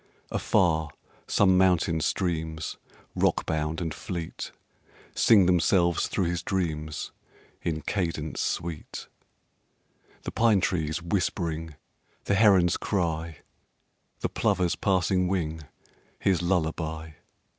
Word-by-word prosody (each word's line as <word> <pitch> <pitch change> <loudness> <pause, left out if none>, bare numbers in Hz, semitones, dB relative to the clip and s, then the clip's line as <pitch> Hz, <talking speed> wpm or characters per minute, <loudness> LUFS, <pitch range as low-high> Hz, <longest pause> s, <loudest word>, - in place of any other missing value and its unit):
Afar 80 -4 +2 0.4
some 95 -2 +4
mountain 90 -3 +3
streams, 80 -3 -2 0.4
rockbound 80 0 0
and 80 -3 -3
fleet, 85 -2 -6 0.6
Sing 105 -5 +5
themselves 85 -1 +3
through 95 - -1
his 85 0 -1
dreams 80 -5 -3 0.5
in 80 -2 -2
cadence 85 -4 -2
sweet, 80 -2 -4 1.2
The - - -4
pine 110 -3 +4
trees 80 -2 -1
whispering, 85 -4 -2 0.5
the - - 0
heron's 95 -4 +5
cry, 85 -5 -2 0.8
The - - 0
plover's 95 -5 +1
passing 90 -1 +1
wing, 80 -4 -2 0.5
his 95 -3 +1
lullaby. 80 -2 -1
85 Hz, 95 wpm, -27 LUFS, 80-95 Hz, 1.2 s, Sing